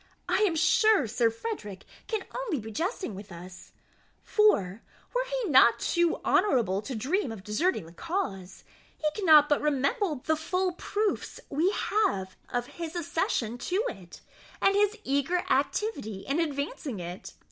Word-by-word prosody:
I -, -, +2 dB
am 340 Hz, -, -1 dB
sure 410 Hz, -, +4 dB
Sir 230 Hz, +1 st, +2 dB
Frederick 225 Hz, -, -6 dB, 0.2 s
can 440 Hz, -3 st, -1 dB
only 465 Hz, -, -2 dB
be 220 Hz, 0 st, -8 dB
jesting 355 Hz, -, -3 dB
with 200 Hz, +1 st, -10 dB
us; 180 Hz, +1 st, -11 dB, 0.5 s
for, 220 Hz, -, +2 dB, 0.3 s
were -, -, 0 dB, 0.2 s
he -, -, -1 dB
not 235 Hz, -4 st, +6 dB
too 345 Hz, +4 st, +1 dB
honourable 225 Hz, -, +2 dB
to 245 Hz, +4 st, -6 dB
dream 275 Hz, -, -1 dB
of 210 Hz, -4 st, -8 dB
deserting 215 Hz, -, 0 dB
the 165 Hz, -, -13 dB
cause, 195 Hz, -, -4 dB, 0.3 s
he -, -, -7 dB
cannot 310 Hz, -7 st, +6 dB
but 290 Hz, -, +2 dB
remember 300 Hz, -, 0 dB
the 315 Hz, -, +2 dB
full 365 Hz, +4 st, -1 dB
proofs 410 Hz, +4 st, -2 dB
we 315 Hz, +6 st, +2 dB
have 385 Hz, -, 0 dB
of 245 Hz, 0 st, -1 dB
his 320 Hz, +5 st, -7 dB
accession 295 Hz, -8 st, -1 dB
to 355 Hz, -, -3 dB
it, -, -, -11 dB, 0.4 s
and 390 Hz, -, +4 dB
his 415 Hz, +2 st, +2 dB
eager 285 Hz, +6 st, 0 dB
activity 220 Hz, -, -1 dB
in 280 Hz, +4 st, 0 dB
advancing 280 Hz, -, -3 dB
it. 175 Hz, +1 st, -7 dB
295 Hz, 150 wpm, -28 LUFS, -, 0.5 s, not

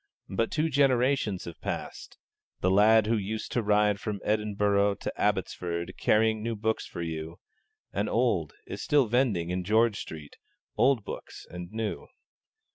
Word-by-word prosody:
But 115 Hz, +4 st, 0 dB
two 160 Hz, 0 st, 0 dB
generations 130 Hz, -, +2 dB
have 85 Hz, -, -9 dB
passed; -, -, -5 dB, 0.4 s
the 90 Hz, -, +2 dB
lad 105 Hz, +2 st, +6 dB
who 115 Hz, +1 st, +1 dB
used 110 Hz, +2 st, -4 dB
to 120 Hz, -, +1 dB
ride 105 Hz, -1 st, +2 dB
from 105 Hz, -1 st, -4 dB
Edinburgh 105 Hz, -1 st, +1 dB
to -, -, -5 dB
Abbotsford, 90 Hz, -4 st, -1 dB
carrying 110 Hz, 0 st, +3 dB
new 115 Hz, +1 st, -2 dB
books 110 Hz, +1 st, -1 dB
for 85 Hz, -, -6 dB
you, 80 Hz, 0 st, -5 dB, 0.6 s
and -, -, -1 dB
old, -, -, +1 dB
is -, -, -6 dB
still 145 Hz, -3 st, +3 dB
vending, 110 Hz, -8 st, +1 dB
in 90 Hz, 0 st, -1 dB
George 110 Hz, +2 st, +3 dB
Street, 75 Hz, -2 st, -9 dB, 0.4 s
old 125 Hz, -5 st, +3 dB
books -, -, -8 dB
and 90 Hz, 0 st, -7 dB
new. 110 Hz, -1 st, -4 dB
105 Hz, 150 wpm, -28 LUFS, 95-115 Hz, 0.6 s, lad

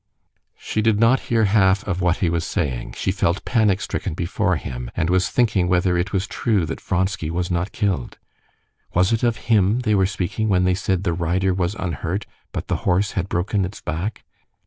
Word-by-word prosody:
She 110 Hz, -, -2 dB
did 110 Hz, -1 st, +2 dB
not 115 Hz, +3 st, +5 dB
hear 115 Hz, -2 st, +3 dB
half 95 Hz, -1 st, +3 dB
of 95 Hz, -2 st, -1 dB
what 90 Hz, 0 st, +2 dB
he -, -, +2 dB
was 85 Hz, -1 st, 0 dB
saying; 65 Hz, -9 st, -2 dB
she -, -, 0 dB
felt 85 Hz, +4 st, 0 dB
panic 105 Hz, -6 st, +2 dB
stricken 80 Hz, -, -3 dB
before 90 Hz, +3 st, 0 dB
him, -, -, -5 dB
and 80 Hz, +2 st, 0 dB
was 90 Hz, 0 st, +2 dB
thinking 105 Hz, -7 st, +2 dB
whether 90 Hz, 0 st, +2 dB
it 85 Hz, +3 st, -1 dB
was 95 Hz, -1 st, 0 dB
true 110 Hz, -5 st, 0 dB
that -, -, -5 dB
Vronsky 95 Hz, -3 st, -1 dB
was 85 Hz, +2 st, -2 dB
not 90 Hz, +3 st, -1 dB
killed. 95 Hz, -, -2 dB, 0.8 s
Was 90 Hz, +5 st, +3 dB
it 115 Hz, -, +1 dB
of 120 Hz, -2 st, +1 dB
him 105 Hz, +2 st, +4 dB
they 110 Hz, -3 st, +1 dB
were 95 Hz, -2 st, +3 dB
speaking 100 Hz, +3 st, -2 dB
when 90 Hz, -2 st, +3 dB
they 90 Hz, 0 st, +3 dB
said 95 Hz, 0 st, -1 dB
the 85 Hz, -, 0 dB
rider 90 Hz, +3 st, 0 dB
was 90 Hz, +2 st, -1 dB
unhurt, 90 Hz, +1 st, -3 dB, 0.3 s
but -, -, -4 dB
the -, -, 0 dB
horse 95 Hz, +3 st, +1 dB
had 95 Hz, -, -2 dB
broken 95 Hz, +3 st, 0 dB
its 95 Hz, +3 st, -5 dB
back? 85 Hz, +6 st, -4 dB
95 Hz, 200 wpm, -22 LUFS, 85-105 Hz, 0.8 s, not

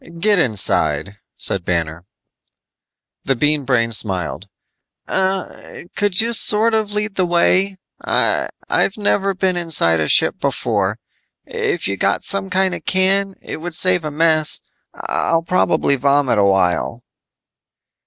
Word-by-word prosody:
"Get 205 Hz, +1 st, +2 dB
inside," 100 Hz, -, 0 dB, 0.2 s
said 95 Hz, -, +1 dB
Banner. 85 Hz, -1 st, -3 dB, 1.2 s
The 135 Hz, -, 0 dB
Bean 145 Hz, +2 st, 0 dB
Brain 115 Hz, -3 st, +1 dB
smiled, 95 Hz, -3 st, 0 dB, 0.6 s
"Er... 190 Hz, 0 st, -3 dB
could 205 Hz, -3 st, 0 dB
you 230 Hz, +1 st, +1 dB
sort 220 Hz, +1 st, +3 dB
of 215 Hz, -2 st, -1 dB
lead 210 Hz, 0 st, -2 dB
the 185 Hz, -2 st, 0 dB
way? 185 Hz, +3 st, +1 dB, 0.3 s
I've 195 Hz, -, -1 dB
never 195 Hz, -2 st, 0 dB
been 185 Hz, -1 st, 0 dB
inside 160 Hz, -, +2 dB
a 80 Hz, -, -1 dB
ship -, -, +2 dB
before. -, -, -1 dB, 0.5 s
If -, -, -2 dB
you 100 Hz, 0 st, -3 dB
got -, -, 0 dB
some 195 Hz, -1 st, 0 dB
kind 190 Hz, 0 st, +1 dB
of -, -, -7 dB
can, 195 Hz, +1 st, +1 dB
it -, -, -6 dB
would 170 Hz, +1 st, -7 dB
save 180 Hz, -1 st, +3 dB
a 155 Hz, -, -3 dB
mess. 155 Hz, 0 st, +1 dB, 0.4 s
I'll 165 Hz, 0 st, -1 dB
probably 160 Hz, -4 st, +1 dB
vomit 140 Hz, -3 st, +1 dB
a 100 Hz, -, +3 dB
while." 95 Hz, -3 st, 0 dB
165 Hz, 135 wpm, -18 LUFS, -, 1.2 s, sort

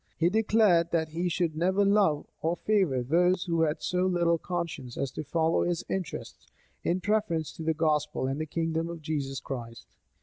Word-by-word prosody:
He 165 Hz, +1 st, +3 dB
declared 210 Hz, -6 st, +3 dB
that 160 Hz, -2 st, 0 dB
he 170 Hz, +3 st, -1 dB
should 170 Hz, -2 st, -1 dB
never 190 Hz, +5 st, +2 dB
love 195 Hz, -7 st, +3 dB, 0.2 s
or 165 Hz, +2 st, 0 dB
favor 185 Hz, -12 st, +1 dB
those 175 Hz, +7 st, +2 dB
who 165 Hz, -3 st, 0 dB
had 155 Hz, 0 st, 0 dB
so 180 Hz, +1 st, +1 dB
little 170 Hz, -2 st, +2 dB
conscience 165 Hz, -9 st, -4 dB
as 135 Hz, -, -2 dB
to -, -, -5 dB
follow 160 Hz, +2 st, +1 dB
his 175 Hz, -1 st, -1 dB
interests, 190 Hz, -2 st, -5 dB, 0.4 s
in 180 Hz, +2 st, 0 dB
preference 195 Hz, -6 st, 0 dB
to -, -, -7 dB
the 160 Hz, 0 st, +1 dB
gospel 150 Hz, -3 st, 0 dB
and 135 Hz, +3 st, -2 dB
the 155 Hz, -, -3 dB
kingdom 165 Hz, +1 st, -1 dB
of 170 Hz, -2 st, -7 dB
Jesus 140 Hz, -4 st, -2 dB
Christ. 115 Hz, -3 st, -7 dB
165 Hz, 180 wpm, -28 LUFS, 155-180 Hz, 0.4 s, He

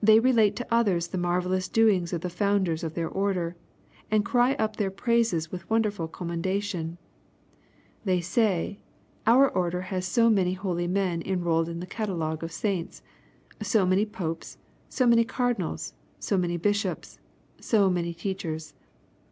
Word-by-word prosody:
They 220 Hz, +1 st, +7 dB
relate 225 Hz, -4 st, +4 dB
to 245 Hz, -, -4 dB
others 190 Hz, -7 st, +2 dB
the 185 Hz, -, -3 dB
marvellous 180 Hz, +1 st, 0 dB
doings 205 Hz, -6 st, +3 dB
of 170 Hz, -3 st, -2 dB
the 180 Hz, -, -3 dB
founders 190 Hz, -3 st, +1 dB
of 160 Hz, -1 st, -4 dB
their 165 Hz, -1 st, -1 dB
order, 185 Hz, -3 st, -1 dB, 0.5 s
and 210 Hz, -1 st, +2 dB
cry 245 Hz, +1 st, +3 dB
up 220 Hz, -4 st, -1 dB
their 205 Hz, -3 st, 0 dB
praises 220 Hz, -6 st, 0 dB
with 180 Hz, -1 st, -7 dB
wonderful 210 Hz, -6 st, +1 dB
commendation. 175 Hz, 0 st, -3 dB, 1.1 s
They 185 Hz, -4 st, +2 dB
say, 190 Hz, +1 st, 0 dB, 0.5 s
our 260 Hz, +4 st, +7 dB
order 180 Hz, -5 st, -1 dB
has 185 Hz, 0 st, -3 dB
so 230 Hz, +4 st, +3 dB
many 185 Hz, -4 st, +2 dB
holy 180 Hz, -2 st, -2 dB
men* 180 Hz, -2 st, 0 dB
enrolled 170 Hz, -3 st, 0 dB
in 170 Hz, 0 st, -5 dB
the -, -, -5 dB
catalogue 170 Hz, -7 st, -3 dB
of 165 Hz, -, -5 dB
saints, 190 Hz, -4 st, -3 dB, 0.6 s
so 215 Hz, -5 st, +2 dB
many 190 Hz, +4 st, +2 dB
Popes, 170 Hz, -6 st, -5 dB, 0.3 s
so 255 Hz, -, +1 dB
many 235 Hz, -1 st, +6 dB
Cardinals, 245 Hz, +1 st, -2 dB, 0.2 s
so 200 Hz, -, -1 dB
many 175 Hz, -2 st, 0 dB
bishops, 205 Hz, +4 st, -1 dB, 0.4 s
so 210 Hz, -4 st, +3 dB
many 170 Hz, -2 st, -1 dB
teachers. 165 Hz, -4 st, -4 dB
185 Hz, 150 wpm, -27 LUFS, 170-215 Hz, 1.1 s, They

